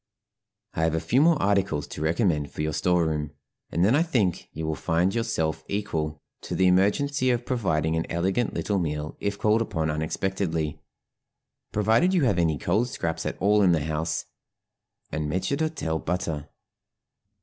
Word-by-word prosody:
I - - -2
have 80 0 +2
a - - +1
few 130 - +2
more 165 -1 +4
articles 95 -7 +1
to - - -7
recommend 80 -2 +1
for 75 - -4
your 75 0 -1
store 90 +1 +2
room, 75 -2 -2 0.4
and 85 +3 +2
then 110 +6 +4
I 150 - +4
think 120 - 0
you 80 - -5
will 80 - -1
find 85 +6 +1
yourself 80 -10 -1
equal 80 -7 -3 0.2
to - - -5
the 95 - +3
emergency 125 +9 +3
of 120 -1 0
providing 80 - 0
an 80 - -1
elegant 95 +8 0
little 100 -2 0
meal 75 -2 -3
if 100 0 -2
called 110 +2 +2
upon 80 -8 -1
unexpectedly, 80 -1 -2 0.9
provided 115 - +3
you 170 - +3
have 100 -8 +2
any 80 -3 +2
cold 110 +11 +1
scraps 80 -7 -3
at - - -4
all 105 +2 +4
in 90 -3 +5
the 80 -3 0
house, 80 +1 -2 0.9
and 75 0 -2
maître 95 - 0
d'hôtel 140 - -2
butter. 80 -4 -2
90 Hz, 170 wpm, -26 LUFS, 80-105 Hz, 0.9 s, in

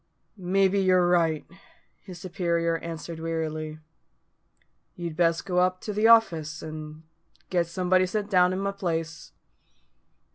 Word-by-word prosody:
"Maybe 195 +1 +1
you're 185 -2 +3
right," 165 -3 +2 0.6
his 185 -3 -10
superior 170 -2 -1
answered 165 0 -7
wearily. 155 -1 -3 1.2
"You'd 170 -3 -5
best 165 0 +1
go 180 -2 0
up 185 0 +2
to 210 - -4
the 210 +2 +3
office, 165 -9 +3
and 155 0 -8 0.5
get 175 -2 +1
somebody 185 +2 +1
sent 205 +2 -2
down 180 -1 +4
i' - - -2
my 200 +1 -1
place. 165 -5 -4
175 Hz, 130 wpm, -26 LUFS, 160-185 Hz, 1.2 s, down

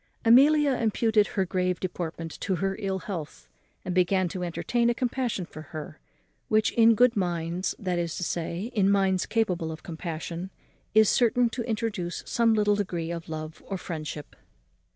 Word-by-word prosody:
In - - -42
short, 230 - +1
Amelia 295 -2 +3
imputed 220 -1 +2
her 190 - -1
grave 180 -1 -1
deportment 165 -3 -4
to 190 +1 -1
her 195 +1 -1
ill 195 -2 -1
health, 150 - -6 0.4
and 180 - -2
began 185 +1 +2
to 180 +1 -4
entertain 235 +7 0
a 240 - +1
compassion 245 -6 -1
for 155 - -10 0.2
her, 150 - -8 0.5
which 215 0 +2
in 230 -1 +5
good 245 +2 +4
minds, 175 -1 -1
that 180 -3 -2
is 170 -1 -2
to - - -3
say, 175 +6 -3
in 200 -4 +3
minds 195 -2 +2
capable 180 -8 0
of 155 - -9
compassion, 170 +2 -5 0.5
is 220 -1 +7
certain 240 +1 +3
to 245 - -3
introduce 210 -6 -2
some 230 -1 +2
little 210 -1 +3
degree 175 -5 -2
of 170 -1 -6
love 155 0 -6
or 195 - -3
friendship. 155 -4 -6
190 Hz, 175 wpm, -27 LUFS, 170-220 Hz, 0.5 s, is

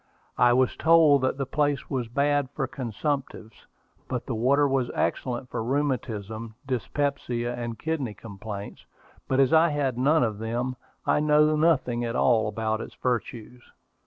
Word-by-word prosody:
I 120 0 +6
was 130 0 +2
told 160 -4 +5
that 130 0 0
the 135 - -2
place 145 0 0
was 130 -4 -2
bad 140 +2 +1
for 135 - -1
consumptives, 130 -4 -4 0.4
but 125 -2 -3
the 130 - -3
water 135 +6 +3
was 135 -3 0
excellent 125 0 -2
for - - -2
rheumatism, 115 -5 -2
dyspepsia, 125 -2 -2
and 120 -2 -5
kidney 145 -9 -3
complaints; 105 -1 -8 0.4
but 130 - +1
as 135 +1 +4
I 165 +1 +6
had 140 -4 -1
none 150 +4 +4
of 110 -3 -2
them, 120 +3 -2 0.3
I - - +3
know 150 +1 +4
nothing 140 -7 +2
at 115 0 -3
all 115 -4 +3
about 110 +1 -2
its - - -9
virtues. 120 0 -3
125 Hz, 155 wpm, -26 LUFS, 115-145 Hz, 0.4 s, I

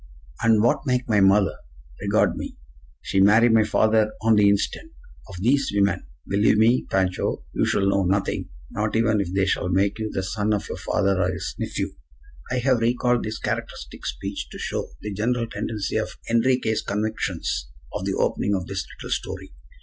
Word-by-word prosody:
And 110 -2 +4
what 120 +4 +2
make 125 0 +1
my 105 -3 +3
mother? 95 +1 +4 0.4
Regard - - +2
me! - - -6 0.5
She 95 - 0
marry 110 +4 +6
my 110 -1 +5
father 110 0 +2
on 115 0 +5
the 105 -1 +5
instant! 100 -8 -1 0.4
Of 100 - -9
thees 130 +7 +2
women, 100 0 +1 0.2
believe 105 +2 +3
me, 115 +3 +3
Pancho, 95 -1 0
you - - +1
shall 100 - +1
know 100 0 +2
nothing. 95 +2 0 0.2
Not 105 +1 -2
even 110 -2 +3
if 90 -3 -4
they 95 0 +2
shall 90 -1 0
make 100 +3 +1
you 110 -1 -2
the 95 - -2
son 105 +2 0
of 100 - -4
your - - -5
father 95 -1 +1
or 90 0 +1
his 85 - -4
nephew." - - -3 0.6
I 125 - -1
have 125 0 +2
recalled 120 +1 +1
this 110 +1 -4
characteristic - - -5
speech - - -4
to - - -9
show - - -3
the 105 0 -5
general 115 +4 0
tendency 115 -3 -3
of - - -3
Enriquez' 115 -1 +2
convictions 105 - -2 0.3
at - - -3
the - - -1
opening 100 - +1
of 90 -2 -3
this - - -3 0.2
little - - -7
story. - - -4
105 Hz, 180 wpm, -24 LUFS, 100-115 Hz, 0.6 s, marry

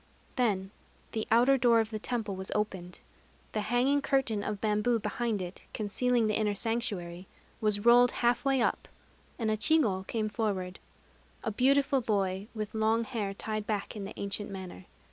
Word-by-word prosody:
Then 200 -6 0 0.4
the 220 - -3
outer 250 +4 +5
door 235 -2 +5
of 225 0 -1
the 215 - -3
temple 220 -3 -2
was 190 0 -6
opened; 190 -4 -3 0.5
the 215 - -1
hanging 250 +6 +2
curtain 255 -7 +1
of 210 -1 -3
bamboo 215 +3 +1
behind 215 -1 -2
it, 180 +1 -9
concealing 235 +3 +1
the 215 - +1
inner 210 -1 +1
sanctuary, 195 -6 -3 0.3
was 210 -1 0
rolled 245 +1 +7 0.2
half 240 +1 +3
way 270 -3 +2
up; - - -1 0.5
and 225 -3 0
a - - +2
chigo 215 -7 +3
came 220 -2 -1
forward, 200 -4 -2 0.6
a 225 - -1
beautiful 275 +4 +3
boy, 195 -3 -1
with 215 -1 -4
long 220 +1 +2
hair 220 -5 -3
tied 215 0 -4
back 210 -1 -2
in 205 - -5
the 200 - -9
ancient 200 +1 -3
manner. 185 - -8
215 Hz, 165 wpm, -30 LUFS, 200-240 Hz, 0.6 s, rolled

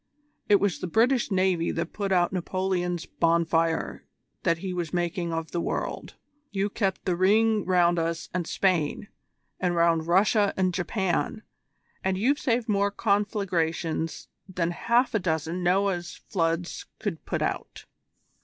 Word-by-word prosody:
It 205 -1 +6
was 200 -2 0
the - - -3
British 235 +7 +2
Navy 185 -3 +1
that 170 0 -3
put 200 -2 -2
out 180 -1 +3
Napoleon's 180 -1 -1
bonfire 165 0 +1 0.4
that 165 -1 +2
he 185 +2 -4
was 175 -3 -3
making 175 0 -1
of 165 0 -3
the 170 - -1
world: - - -3 0.3
you 200 0 -1
kept 195 -4 -1
the 180 - +1
ring 210 +3 +3
round 175 -2 +3
us 165 0 -2
and 175 -2 -2
Spain, 185 0 0 0.5
and 180 -2 0
round 165 -1 +2
Russia 200 +3 +3
and 185 -1 +1
Japan, 190 +3 -1 0.6
and 190 0 0
you've 270 +9 +2
saved 240 -2 0
more 200 -1 +2
conflagrations 180 -6 -1 0.2
than 175 -2 -1
half 235 +8 +1
a 215 - +2
dozen 165 0 -2
Noah's 180 -1 +1
floods 165 -2 -2 0.2
would - - -2
put - - -1
out. - - -4
180 Hz, 145 wpm, -26 LUFS, 170-200 Hz, 0.6 s, It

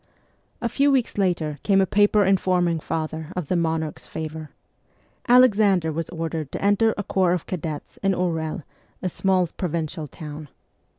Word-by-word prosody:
A 235 - 0
few 280 +5 +2
weeks 255 -6 +1
later 165 -6 0
came 195 -2 +3
a 190 - +4
paper 205 +1 +3
informing 180 -3 +2
father 160 0 -4
of 180 -6 -4
the - - +1
'monarch's 160 -2 -2
favour. 155 -1 -6 0.8
1 245 - +6
Alexander 200 -9 +4
was 165 +1 -4
ordered 160 -3 -4
to - - -3
enter 215 +2 +3
a 205 - -2
corps 185 -2 +2
of 180 - -2
cadets 160 -4 -5
in 195 -1 +2
Orel, 165 -3 -2 0.4
a 185 - 0
small 185 0 +1
provincial 165 -2 -4
town. 150 +1 -9
175 Hz, 160 wpm, -24 LUFS, 160-195 Hz, 0.8 s, 1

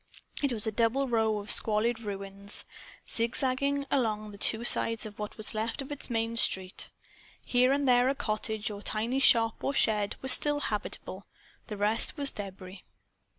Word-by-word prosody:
It 280 -2 0
was 220 -3 0
a 220 - -1
double 235 +5 0
row 220 -3 0
of 205 0 0
squalid 220 +2 +3
ruins, 200 -1 -4 0.4
zig 230 +1 -2
zagging 280 +1 -1
along 215 -5 -1
the 200 - -13
two 220 +2 +2
sides 230 -2 +3
of 210 -1 -11
what 210 0 -7
was 215 +1 -1
left 220 +4 -4
of 275 +1 -7
its 290 - -7
main 230 -1 -2
street. 190 -4 -1 0.6
Here 250 +1 +2
and 280 0 0
there 250 0 +3
a 275 - -1
cottage 215 -2 -3
or 200 -1 -8
tiny 230 +6 -2
shop 230 -4 +3
or 275 - -2
shed 210 -4 +1
was 265 - +6
still 290 -1 +6
habitable. 205 -4 -5 0.4
The 210 - -7
rest 210 +8 +1
was 280 -1 +6
debris. 190 -2 -9
225 Hz, 175 wpm, -28 LUFS, 210-255 Hz, 0.6 s, was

